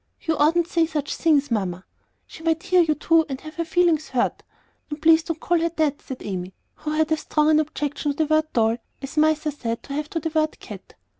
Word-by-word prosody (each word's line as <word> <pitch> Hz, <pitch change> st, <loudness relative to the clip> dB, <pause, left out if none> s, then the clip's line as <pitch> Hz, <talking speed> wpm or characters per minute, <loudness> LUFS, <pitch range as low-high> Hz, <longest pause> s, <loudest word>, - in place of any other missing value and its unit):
You 320 Hz, -1 st, -1 dB
oughtn't 325 Hz, +4 st, +3 dB
to 345 Hz, -, -19 dB
say 335 Hz, -1 st, +3 dB
such 295 Hz, -3 st, -3 dB
things, 295 Hz, -5 st, +2 dB
Mamma; 185 Hz, -4 st, -2 dB, 0.4 s
she -, -, -13 dB
might 325 Hz, 0 st, 0 dB
hear 365 Hz, -1 st, +4 dB
you, 315 Hz, -2 st, +2 dB
too, 325 Hz, +2 st, +3 dB
and 265 Hz, -1 st, -4 dB
have 310 Hz, +1 st, -11 dB
her 335 Hz, -, 0 dB
feelings 330 Hz, -2 st, +1 dB
hurt. 250 Hz, -2 st, 0 dB, 0.5 s
And 295 Hz, 0 st, -5 dB
please 320 Hz, +1 st, +5 dB
don't 325 Hz, -1 st, -5 dB
call 345 Hz, 0 st, +1 dB
her 335 Hz, +1 st, +1 dB
that," 300 Hz, -2 st, 0 dB
said 265 Hz, -3 st, -8 dB
Amy, 185 Hz, -2 st, -5 dB, 0.2 s
who 305 Hz, -, -7 dB
had 310 Hz, +1 st, 0 dB
as 315 Hz, -, +2 dB
strong 300 Hz, 0 st, +2 dB
an 310 Hz, -, +5 dB
objection 295 Hz, -1 st, -2 dB
to -, -, -22 dB
the 315 Hz, -, +2 dB
word 310 Hz, 0 st, +1 dB
"doll" 225 Hz, 0 st, +2 dB, 0.3 s
as 275 Hz, -, -7 dB
mice 310 Hz, 0 st, +2 dB
are 300 Hz, -, +1 dB
said 230 Hz, -5 st, -4 dB
to 280 Hz, -, -7 dB
have 295 Hz, +1 st, -3 dB
to 330 Hz, -, -2 dB
the 325 Hz, -, -3 dB
word 310 Hz, -1 st, 0 dB
"cat." -, -, -11 dB
310 Hz, 240 wpm, -23 LUFS, 285-325 Hz, 0.5 s, please